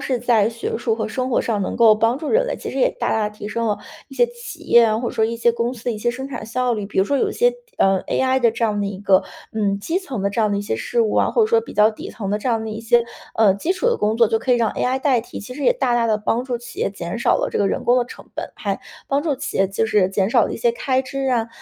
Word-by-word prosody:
是 255 -2 -1
在 225 -3 +3
学 230 -1 -4
术 230 -2 0
和 220 - -2
生 255 +4 -3
活 245 - +1
上 215 -3 -1
能 - - -3
够 225 -2 +6
帮 225 +3 +1
助 300 +1 -4
人 - - +3
类， - - -2
其 - - -6
实 - - -4
也 - - +4
大 - - 0
大 215 -1 +1
地 210 - -17
提 205 - -5
升 230 +1 -2
了 210 - +1 0.3
一 - - -12
些 485 - +4
企 480 0 -10
业 235 - +5
啊， 215 0 +1
或 240 - -2
者 - - -11
说 220 - +2
一 230 +1 -3
些 235 0 +3
公 235 +2 -2
司 230 - -13
的 245 - 0
一 210 - -6
些 240 +2 0
生 265 +3 -6
产 245 -5 -7
效 250 +2 0
率。 210 -3 -3
比 - - -11
如 190 - +5
说 280 +4 0
有 - - +1
一 - - -4
些， - - +3 0.2
呃 195 -1 +3
，AI 260 0 +1
的 235 -2 +4
这 230 +1 -1
样 210 -2 0
的 200 - -1
一 195 -1 -5
个 195 -2 +3 0.3
嗯， 200 -2 0
基 330 - -1
层 265 - -5
的 200 - 0
这 215 - -1
样 215 -1 +2
的 200 - 0
一 200 - -2
些 205 - -2
事 230 - 0
物 215 - 0
啊， - - +3
或 460 - +3
者 - - +4
说 455 +1 +3
比 - - -11
较 210 +1 +5
底 215 - -9
层 200 -3 -5
的 210 - 0
这 250 - -3
样 225 -2 0
的 220 - -5
一 215 +1 -5
些， 235 +1 +3 0.3
呃， 210 -4 +4
基 335 - -1
础 370 - -6
的 475 - +1
工 215 +2 +1
作 230 - +5
就 225 +1 +1
可 250 +2 +1
以 - - +2
让 230 -2 +1
AI 260 +1 0
代 265 -3 +2
替， 230 - -9
其 205 - -8
实 285 +2 -5
也 - - +5
大 250 - +1
大 235 -1 +2
地 215 -1 +2
帮 225 +3 -1
助 250 -2 -2
企 240 +1 -11
业 - - 0
减 185 +2 -5
少 - - +3
了 - - -2
这 - - 0
个 200 -1 +2
人 - - -2
工 245 +1 +4
的 245 - +1
成 - - -12
本。 - - -5
还 - - -3 0.3
帮 280 +1 0
助 305 -4 0
企 270 +1 -5
业 195 -1 +3
就 200 +3 0
是 210 -4 +2
减 195 +2 0
少 - - +4
了 - - -4
一 - - -4
些 475 -1 +1
开 265 - 0
支 270 +1 -4
啊， 235 -2 0
230 Hz, 365 characters per minute, -21 LUFS, 210-260 Hz, 0.3 s, 够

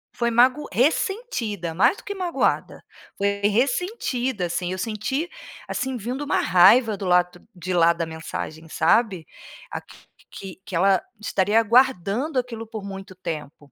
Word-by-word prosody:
foi 235 -1 0
mago 255 +5 +3
ressentida, 245 - 0
mais 185 - +4
do - - -13
que 405 - -5
magoada, 360 -3 -1 0.3
foi 200 - +1 0.2
ressentida, 250 - -1
assim, 175 +1 -2
eu - - -4
senti, 230 - -2 0.4
assim, 265 -1 -3
vindo 245 +6 -4
uma - - +1
raiva 205 +5 +5
do 195 - -5
lado 180 0 +2 0.2
de 185 +1 -4
lá 170 -1 +5
da 170 - -3
mensagem 160 0 -7
sabe. 185 +1 +2 0.5
Aqui - - -8 0.3
que 190 -2 -9
que 185 - -6
ela 190 +1 +3 0.2
estaria 215 +1 +2
guardando 245 - +2
aquilo 230 -2 -5
por 220 -2 -7
muito 195 -1 -8
tempo. 150 -5 -7
210 Hz, 145 wpm, -23 LUFS, 180-255 Hz, 0.5 s, raiva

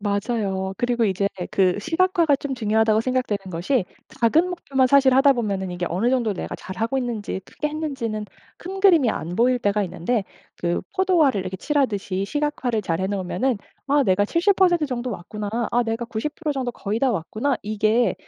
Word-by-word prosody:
맞아요. 200 -2 -1
그리고 240 -1 +1
이제 200 0 +1 0.2
그 185 -2 +2
시각화가 335 - +2
좀 275 -1 -4
중요하다고 220 -1 +2
생각되는 255 -4 -1
것이 185 +7 0 0.4
작은 310 +10 +4
목표만 275 -7 +1
사실 270 0 +5
하다 275 +1 +6
보면은 200 -6 -2
이게 175 0 -3
어느 190 +8 0
정도 240 -5 +1
내가 - - -5
잘하고 225 +7 -3
있는지 230 -6 -3
크게 300 - -4
했는지는 270 -9 -3 0.3
큰 380 +2 -6
그림이 335 - +5
안 170 +2 -4
보일 245 +4 +3
때가 205 -1 +1
있는데 185 +6 -1 0.4
그 175 0 0 0.2
포도알을 340 - +3
이렇게 185 0 -5
칠하듯이 205 - -1
시각화를 290 -6 -1
잘해 185 +1 -1
놓으면은 205 +5 -1 0.3
'아 285 0 +4
내가 195 0 +3
70% 350 - +3
정도 250 -2 -3
왔구나. 210 +2 -5 0.2
아 245 - +3
내가 225 0 -2
90% 295 +7 -3
정도 260 -3 -2
거의 215 -1 -3
다 270 - +3
왔구나.' 225 - -1
이게 215 +3 +1
235 Hz, 370 characters per minute, -23 LUFS, 200-275 Hz, 0.4 s, 하다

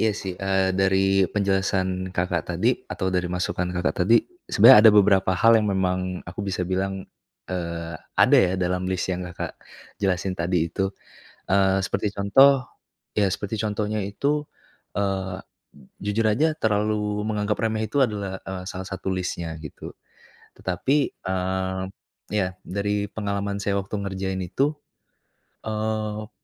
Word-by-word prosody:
iya 110 - +3
sih, 95 -2 -4
eee, 95 -1 +1
dari 95 0 +3
penjelasan 95 -2 0
Kakak 90 +1 0
tadi, - - +2 0.2
atau 95 - -2
dari 90 -1 0
masukan 90 0 -2
Kakak 90 0 0
tadi, 115 +5 +5 0.3
sebenarnya 115 +3 +8
ada 110 - +10
beberapa 100 -2 +5
hal 115 +5 +6
yang 105 - -1
memang 90 -1 +1 0.3
aku 95 +4 -6
bisa 95 -2 -2
bilang, 95 +1 -2 0.5
eee, 85 -2 -4 0.2
ada - - +6
ya 90 -1 +3
dalam 90 0 0
list 95 0 -1
yang 90 - -3
Kakak 90 - -6 0.4
jelasin 95 -1 0
tadi 85 -1 +1
itu. 95 +3 -1 0.6
Eee, 95 0 +3
seperti 100 +2 -2
contoh 130 +7 +5 0.5
iya, 105 -2 +4
seperti 100 +2 -4
contohnya 105 0 -1
itu, 145 +9 -1 0.5
eee, 95 -2 -1 0.7
jujur 105 +2 0
aja 155 +9 +2
terlalu 105 -2 0
menganggap 105 -1 -1
remeh 110 -1 0
itu 145 - 0
adalah, 100 -5 -3
eee, 95 -1 -6
salah 95 0 -6
satu 95 0 -4
list-nya, 85 -3 -3
gitu. 75 - -8 0.7
Tetapi, 95 +10 0 0.3
eee, 95 0 -2 0.5
iya, 95 -3 0
dari 100 +1 -1
pengalaman 100 -1 -2
saya 100 0 +1
waktu 100 +2 -6
ngerjain 95 -1 -3
itu, 140 - 0 0.9
eee 110 0 -2
95 Hz, 140 wpm, -24 LUFS, 95-105 Hz, 0.9 s, ada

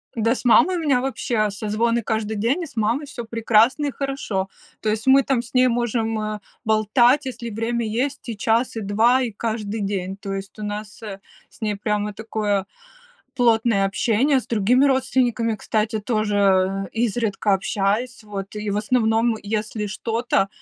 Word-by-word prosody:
Да 230 0 +2
с - - -7
мамой 355 +9 +5
у - - -2
меня 280 -6 +2
вообще 240 -5 -1
созвоны 220 +3 0
каждый 220 0 -2
день, 235 - 0
и - - -3
с 280 - -14
мамой 230 +6 0
всё 245 -4 -7
прекрасно 230 +5 +3
и - - -2
хорошо. 255 -8 -3 0.3
То 215 - 0
есть 215 +1 -1
мы 270 +1 +7
там 260 -3 +1
с 235 - -14
ней 255 0 +5
можем, 230 -2 0
э, 215 0 -3 0.3
болтать, 240 +6 +3
если 240 -2 -5
время 230 +2 -2
есть 260 +7 -2
и 230 - -4
час, 230 +4 +1
и 225 - -3
2, 225 +6 +3
и 245 -3 -2
каждый 220 0 -3
день. 195 -1 -3
То 200 -1 -5
есть 195 +1 -7
у - - -5
нас, 210 +1 -6
э, 200 -3 -7 0.3
с - - -22
ней 210 -2 -1
прямо 210 0 -2
такое 210 -2 -1 0.7
плотное 230 -4 +3
общение 235 +7 +2
с - - -14
другими 240 +5 +3
родственниками, 250 -4 +1
кстати, 215 +1 -1
тоже, 215 -1 -1 0.6
э, 225 - -2
изредка 220 -3 0
общаюсь. 205 +5 -1
Вот 200 -1 -7
и 210 0 -3
в 200 - -1
основном, 225 0 +2
если 215 0 -2
что-то, 225 0 0
225 Hz, 175 wpm, -22 LUFS, 210-245 Hz, 0.7 s, мы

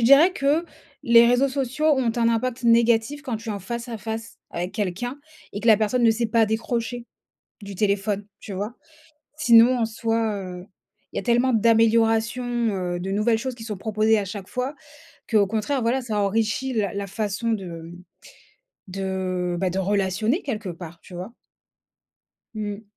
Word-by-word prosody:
dirais 280 +9 +7
que 295 +1 +1 0.4
les 235 0 +7
réseaux 245 +3 +3
sociaux 270 +2 -1
ont 265 -6 +3
un 230 -1 +3
impact 240 +2 -1
négatif 235 +4 +3
quand 250 -4 -3
tu 225 +1 -10
es - - -1
en 200 - -4
face 235 +5 -5
à 230 - -4
face 225 +2 -6
avec 175 +2 -4
quelqu'un 215 +6 -3 0.3
et 205 - -5
que 225 - -5
la 220 -2 +7
personne 220 +4 0
ne 230 - +6
sait 230 +1 0
pas 225 0 +3
décrocher, 230 +2 -2 0.6
du 200 0 -8
téléphone, 205 +1 0
tu 205 - -8
vois? 205 +5 -4 0.6
Sinon, 245 -3 +6
en 230 - +2
soi, 225 -1 -1
heu, 180 -2 -7 0.5
il - - -6
y - - +2
a - - -6
tellement 245 +1 +2
d'améliorations, 225 +1 +3
heu, 205 -7 -1
de 190 +2 -4
nouvelles 215 +3 +2
choses 255 +2 -4
qui 230 - -10
sont 215 -3 -5
proposées 215 +2 +2
à 200 - -3
chaque 195 0 -7
fois 255 +4 -3 0.6
qu'au 210 -3 +4
contraire, 225 +6 -1
voilà, 240 +4 +1
ça 225 -4 -3
enrichit 220 +6 0
la 205 -5 -1
la 200 0 -3
façon, 210 +3 -2
de, 205 -4 -2
mmh, 165 -1 -8 1.0
de, 185 -2 -2
bah, 185 - +1
de 185 +2 -2
relationner 200 - 0
quelque 220 -7 -4
part, 170 -1 -9
tu - - -15
vois? 180 +6 -7 1.2
Mmh. 210 -1 -4
225 Hz, 180 wpm, -24 LUFS, 200-240 Hz, 1.2 s, dirais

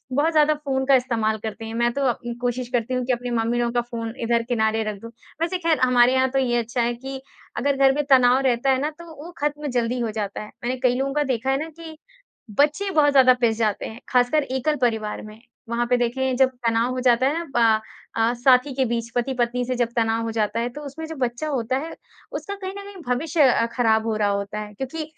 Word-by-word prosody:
बहुत 310 +3 +2
ज़्यादा 305 -1 +4
फ़ोन 270 -3 -2
का 275 0 +5
इस्तेमाल 225 -4 0
करते 220 +1 -5
हैं। 225 - -6
मैं 235 +1 +2
तो 280 -1 0
उम, 240 0 -6
कोशिश 245 0 -2
करती 245 +1 0
हूँ 250 -1 -1
कि 255 - +1
अपनी 245 0 -4
मम्मी 230 +2 0
लोगों 235 0 0
का 240 - +2
फ़ोन 230 -2 -6
इधर 235 0 +2
किनारे 220 -2 +1
रख 200 - -10
दूँ, 230 - -9 0.3
वैसे 345 +2 0
ख़ैर 330 -3 +1
हमारे 250 0 +5
यहाँ 260 0 +2
तो 270 - +1
ये 240 -2 +1
अच्छा 235 +2 -2
है 240 +1 +1
कि 265 +2 -7 0.4
अगर 280 0 +1
घर 270 0 +5
में 295 - 0
तनाव 255 -1 +6
रहता 255 +2 +2
है 260 0 +1
ना 300 - 0
तो 340 - -10 0.2
वो 350 - -9
खत्म 295 0 -2
जल्दी 245 -1 -1
हो 230 -2 -1
जाता 210 -2 -4
है। 210 - -8 0.2
मैंने 250 +2 -1
कई 250 -1 +3
लोगों 275 +1 -1
का 295 0 +1
देखा 260 -1 -1
है 270 - +2
ना 325 - -7
कि 320 -1 -9 0.5
बच्चे 300 - +1
बहुत 300 -4 +4
ज़्यादा 260 -2 +6
पिस 225 -2 +2
जाते 215 -3 0
हैं, 220 - -8
ख़ासकर 250 +4 +3
एकल 265 +4 0
परिवार 220 -3 0
में। 215 +1 -12 0.3
वहाँ 235 +1 0
पे 250 - +4
देखिए 255 +2 0
जब 265 0 +4 0.2
तनाव 230 +2 +2
हो 255 - -3
जाता 245 0 +3
है 340 - -3
प 220 -2 +4 0.4
अ, 225 +1 +2
साथी 255 +3 +4
के 265 - +2
बीच, 230 0 -2
पति-पत्नी 245 0 0
से 255 - -2
जब 240 -1 0
तनाव 225 0 +1
हो 225 - -3
जाता 220 0 -1
है, 235 - -1
तो 295 +5 -9
उसमें 300 +4 -7
जो 320 - -7
बच्चा 245 +4 -2
होता 255 -2 -1
है, 315 +4 -6 0.4
उसका 400 - -5
कहीं 380 -1 -6
न 400 - -6
कहीं 395 -3 -10
भविष्य 290 +5 +1
अ, 240 -3 +4
ख़राब 220 -3 +2
हो 220 - 0
रहा 210 -1 +1
होता 200 +1 -2
है 210 0 -7
क्योंकि 270 +8 -5
245 Hz, 245 wpm, -23 LUFS, 230-275 Hz, 0.5 s, तनाव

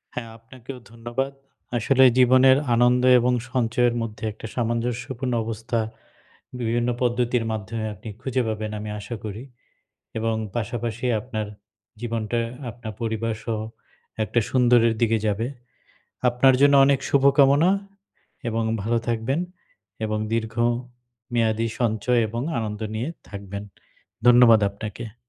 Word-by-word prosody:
হ্যাঁ, 115 -2 -5
আপনাকেও 125 +3 -11
ধন্যবাদ। 120 +4 -3 0.5
আসলে 130 +3 +4
জীবনের 130 +1 +6 0.2
আনন্দ 125 +1 +4 0.2
এবং 125 +1 +2 0.2
সঞ্চয়ের 120 -1 +1
মধ্যে 110 -1 -6
একটা 110 - -11
সামঞ্জস্যপূর্ণ 120 +2 -2
অবস্থা, 115 +1 -2 0.8
বিভিন্ন 120 +1 0
পদ্ধতির 120 -1 +1
মাধ্যমে 110 +1 -4
আপনি 105 +2 -10
খুঁজে 130 0 0
পাবেন 110 -1 -3
আমি 105 0 -6
আশা 105 +3 -6
করি 105 +2 -6 0.7
এবং 115 0 0 0.2
পাশাপাশি 120 +1 -3
আপনার 110 -2 -4 0.5
জীবনটা 115 -1 -2 0.3
আপনার 115 -1 -8
পরিবারসহ 110 0 -2 0.7
একটা 115 +3 +1
সুন্দরের 120 -2 +4
দিকে 115 -1 +3
যাবে। 110 +3 0 0.8
আপনার 125 +2 +4
জন্য 145 0 +6
অনেক 140 -1 +3
শুভকামনা 140 +4 +5 0.8
এবং 115 0 -1 0.2
ভালো 115 +1 +1
থাকবেন 120 +6 0 0.7
এবং 110 0 -1 0.2
দীর্ঘ 115 -1 -1 0.8
মেয়াদী 115 -1 +1
সঞ্চয় 120 +1 +1
এবং 115 +3 -4 0.2
আনন্দ 105 -1 -3
নিয়ে 120 +8 -2 0.2
থাকবেন, 100 0 -7 0.6
ধন্যবাদ 120 -2 +7
আপনাকে। 110 +2 -7
115 Hz, 115 wpm, -24 LUFS, 110-125 Hz, 0.8 s, ধন্যবাদ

